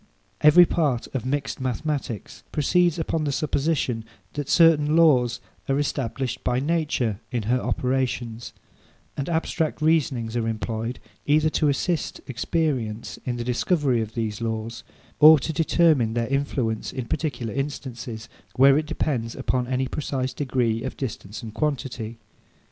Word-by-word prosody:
Every 150 +4 +8
part 145 -8 0
of 130 -2 -3
mixed 140 0 -2
mathematics 130 - -3
proceeds 175 +3 +2
upon 160 -1 -1
the 145 - 0
supposition 140 -5 0 0.3
that 145 -2 -4
certain 155 -3 +5
laws 125 -7 +4 0.3
are 135 - +2
established 135 -3 -2
by 125 0 +1
nature 145 - 0
in 120 -3 -2
her 125 +4 +1
operations; 125 -3 -2 0.6
and 140 - -3
abstract 160 -1 -1
reasonings 135 -8 +1
are 115 -1 0
employed, 115 +2 -3 0.3
either 155 +2 +3
to 150 - +2
assist 160 +3 -1
experience 125 -5 -2
in 125 - -1
the 120 - -3
discovery 125 0 +1
of 110 0 -6
these 110 -2 -3
laws, 115 0 -3 0.4
or 155 +1 +10
to 155 +4 -3
determine 155 -7 +3
their 120 -1 +1
influence 135 -5 -1
in 130 - -4
particular 120 -5 -3
instances, 125 -5 -5 0.3
where 135 +2 +6
it 155 - -4
depends 120 -8 -2
upon 125 -1 -1
any 130 +1 0
precise 130 -2 -3
degree 125 -5 0
of - - -5
distance 110 -5 -6
and 110 -2 -7
quantity. 125 -5 -3
130 Hz, 140 wpm, -24 LUFS, 115-150 Hz, 0.6 s, or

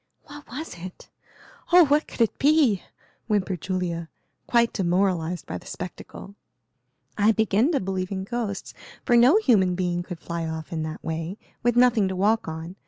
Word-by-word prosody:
"What 290 0 -12
was 265 - -7
it? 180 +1 -10 0.6
Oh, 355 -1 +8
what 295 +2 +2
could - - -6
it 225 - +1
be?" 280 - +4 0.5
whimpered 195 -5 -1
Julia, 170 -3 -3 0.4
quite 235 -1 +3
demoralized 180 -2 0
by - - -5
the - - -16
spectacle. 185 +2 -8 0.9
"I 210 +2 +5
begin 220 - +2
to 280 - +2
believe 185 0 -3
in 190 -1 -3
ghosts, 205 -2 -4 0.3
for 240 - +3
no 250 - +6
human 200 - +3
being 175 -1 -1
could 175 0 -7
fly 170 -1 -4
off 160 0 -6
in 160 - -2
that 155 0 -6
way, 165 +4 -4 0.2
with 240 0 +1
nothing 240 -5 +4
to 190 - -3
walk 210 +4 +1
on. 160 +3 -6
195 Hz, 170 wpm, -25 LUFS, 175-235 Hz, 0.9 s, Oh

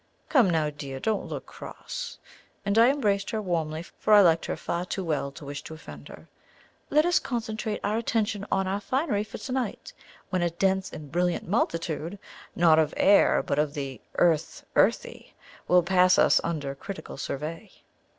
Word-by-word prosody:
Come 250 -10 +5
now, 155 -3 +1
dear, 140 -2 -7
don't 215 +7 -1
look - - -6
cross!" - - -8 0.5
and 200 0 +1
I 235 +2 +7
embraced 205 -8 0
her 220 - -2
warmly, 165 -5 -2
for 210 +4 +2
I 205 - +9
liked 165 -3 +3
her - - -3
far 170 +1 -3
too 190 +1 -4
well 150 -4 -1
to 145 - -11
wish 145 0 -6
to 160 - -8
offend 160 - -11
her. - - -13 0.6
"Let 305 +2 +4
us 350 -1 +3
concentrate 220 -3 -3
our 215 +2 0
attention 210 -3 -1
on 190 - +1
our 195 +2 -2
finery 255 -2 0
for 215 - -9
to 260 - -7
night, 260 - -3 0.4
when 185 -2 0
a 175 - +2
'dense 190 +2 0
and 145 -3 -9
brilliant 175 +1 0
multitude,' 165 -3 -1 0.4
not 165 -2 +5
of 155 -1 +1
air, 200 +1 +5
but 140 0 -1
of 150 0 0
the 135 -4 -5
'earth 165 -3 +1
earthy,' - - +1 0.3
will 180 0 +5
pass 185 +1 +4
us - - +5
under 150 -5 -3
critical 160 +3 -8
survey. 155 +9 -5
180 Hz, 180 wpm, -27 LUFS, 155-210 Hz, 0.6 s, I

